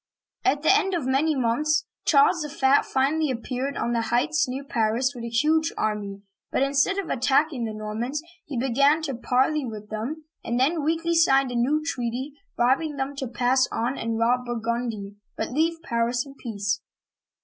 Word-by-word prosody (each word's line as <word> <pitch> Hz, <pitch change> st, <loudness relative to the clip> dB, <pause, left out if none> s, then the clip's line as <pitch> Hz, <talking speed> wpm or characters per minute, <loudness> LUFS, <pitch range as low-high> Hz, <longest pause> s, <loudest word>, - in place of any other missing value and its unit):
At 285 Hz, +2 st, +1 dB
the 355 Hz, -, +6 dB
end 385 Hz, -3 st, +1 dB
of 325 Hz, -7 st, -2 dB
many 280 Hz, +4 st, +2 dB
months, 295 Hz, +6 st, +1 dB, 0.2 s
Charles 315 Hz, +3 st, +5 dB
the 300 Hz, -, -4 dB
Fat 280 Hz, -2 st, +3 dB
finally 290 Hz, +3 st, +1 dB
ap 235 Hz, -2 st, -5 dB
peared 265 Hz, +2 st, -3 dB
on 235 Hz, -, -1 dB
the 230 Hz, -, +1 dB
heights 280 Hz, +6 st, +1 dB
near 265 Hz, +2 st, -4 dB
Paris 240 Hz, +1 st, 0 dB
with 240 Hz, -3 st, -8 dB
a 235 Hz, -, -4 dB
huge 310 Hz, +7 st, +2 dB
army; 200 Hz, -2 st, -2 dB, 0.3 s
but, -, -, +2 dB
instead 275 Hz, +8 st, +2 dB
of 395 Hz, -4 st, -3 dB
attacking 265 Hz, 0 st, +1 dB
the 220 Hz, -, -4 dB
Normans, 220 Hz, +7 st, -3 dB, 0.3 s
he 285 Hz, -4 st, -4 dB
began 280 Hz, +6 st, +3 dB
to 280 Hz, -4 st, -2 dB
parley 260 Hz, +5 st, +1 dB
with 215 Hz, -3 st, -7 dB
them, 265 Hz, +9 st, -4 dB, 0.2 s
and 240 Hz, +1 st, -1 dB
then 300 Hz, +4 st, +2 dB
weakly 330 Hz, +2 st, 0 dB
signed 275 Hz, -5 st, +4 dB
a -, -, -4 dB
new 285 Hz, +6 st, +1 dB
treaty, 250 Hz, +1 st, -3 dB, 0.2 s
bribing 275 Hz, +5 st, +2 dB
them 275 Hz, +1 st, -3 dB
to 265 Hz, -, -3 dB
pass 250 Hz, +2 st, +2 dB
on 240 Hz, +4 st, -1 dB
and 230 Hz, -2 st, -2 dB
rob 245 Hz, +2 st, +2 dB
Burgundy, 230 Hz, -3 st, -3 dB, 0.2 s
but -, -, -3 dB
leave 325 Hz, +4 st, +1 dB
Paris 235 Hz, -1 st, 0 dB
in 275 Hz, -, -11 dB
peace. 205 Hz, -5 st, -3 dB
265 Hz, 180 wpm, -25 LUFS, 235-300 Hz, 0.3 s, the